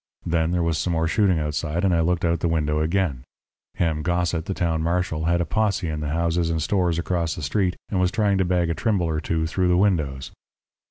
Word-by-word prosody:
Then 80 Hz, -1 st, +1 dB
there 90 Hz, 0 st, 0 dB
was 85 Hz, -1 st, 0 dB
some 90 Hz, -, -1 dB
more 80 Hz, 0 st, +1 dB
shooting 95 Hz, 0 st, +2 dB
outside, 75 Hz, +2 st, -2 dB
and 95 Hz, -, +3 dB
I 85 Hz, -, +2 dB
looked 85 Hz, +2 st, +1 dB
out 85 Hz, -1 st, +1 dB
the 85 Hz, -, 0 dB
window 75 Hz, -2 st, 0 dB
again. 80 Hz, -4 st, 0 dB, 0.5 s
Ham 80 Hz, -3 st, 0 dB
Gossett, 85 Hz, -1 st, -1 dB
the 95 Hz, -1 st, -3 dB
town 80 Hz, -2 st, 0 dB
marshal, 85 Hz, -1 st, -1 dB
had 85 Hz, +1 st, +2 dB
a -, -, 0 dB
posse 95 Hz, 0 st, 0 dB
in 75 Hz, -1 st, -3 dB
the 75 Hz, -1 st, -3 dB
houses 85 Hz, +1 st, 0 dB
and 80 Hz, -1 st, 0 dB
stores 90 Hz, 0 st, +1 dB
across 85 Hz, -1 st, -1 dB
the 90 Hz, -, -7 dB
street, 90 Hz, +6 st, 0 dB
and 95 Hz, -, -1 dB
was 90 Hz, 0 st, +3 dB
trying 100 Hz, -1 st, +1 dB
to 95 Hz, -, +2 dB
bag 90 Hz, -2 st, +1 dB
a -, -, +1 dB
Trimble 100 Hz, -1 st, 0 dB
or 80 Hz, -1 st, -1 dB
two 80 Hz, 0 st, -1 dB
through 90 Hz, +3 st, 0 dB
the 90 Hz, 0 st, +3 dB
windows. 80 Hz, -9 st, 0 dB
85 Hz, 230 wpm, -23 LUFS, 80-90 Hz, 0.5 s, and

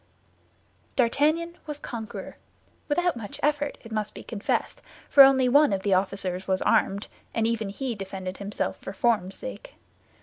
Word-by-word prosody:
D'Artagnan 310 Hz, +7 st, +2 dB
was 300 Hz, -1 st, -4 dB
conqueror—without 290 Hz, +7 st, -4 dB
much 235 Hz, +5 st, -7 dB
effort, 290 Hz, -1 st, 0 dB
it 230 Hz, -, -12 dB
must 215 Hz, -1 st, -2 dB
be -, -, -8 dB
confessed, 220 Hz, -3 st, -2 dB, 0.3 s
for 280 Hz, -, +9 dB
only 270 Hz, -1 st, +7 dB
one 285 Hz, +1 st, +5 dB
of 190 Hz, -1 st, -1 dB
the 200 Hz, -, +2 dB
officers 185 Hz, -1 st, -1 dB
was 190 Hz, -1 st, +1 dB
armed, 200 Hz, +2 st, +2 dB, 0.3 s
and 225 Hz, -, +2 dB
even 225 Hz, -3 st, -1 dB
he 250 Hz, +5 st, -3 dB
defended 190 Hz, -2 st, -6 dB
himself 200 Hz, +1 st, -3 dB
for 195 Hz, -, -8 dB
form's 195 Hz, -3 st, +1 dB
sake. -, -, -8 dB
230 Hz, 145 wpm, -26 LUFS, 195-285 Hz, 0.3 s, for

